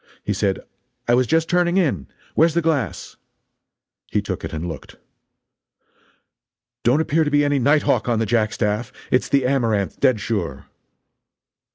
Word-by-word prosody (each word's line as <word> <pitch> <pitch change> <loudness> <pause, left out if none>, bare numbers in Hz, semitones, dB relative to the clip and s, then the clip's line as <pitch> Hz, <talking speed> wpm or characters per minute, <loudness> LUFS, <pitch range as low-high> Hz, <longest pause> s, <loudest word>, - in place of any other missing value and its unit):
He 105 - -1
said: 95 -1 0 0.5
"I 120 - +3
was 125 0 +3
just 160 0 +2
turning 180 0 +2
in. 130 - 0 0.3
Where's 165 +1 +3
the 170 - +3
glass" 145 - -2 0.9
He - - 0
took - - -4
it - - -5
and 80 +2 -4
looked: 80 -5 -8 1.9
"Don't 130 +7 +3
appear 160 +1 +1
to 150 - 0
be 145 0 +3
any 145 -1 +1
night 145 +4 +3
hawk - - +1
on 115 - +2
the 115 - +1
jack 110 0 +1
staff 105 +4 -1 0.2
it's 125 - +2
the 140 -2 +2
Amaranth, 115 -7 0
dead 130 -5 +3
sure!" 85 - -3
125 Hz, 160 wpm, -21 LUFS, 105-150 Hz, 1.9 s, I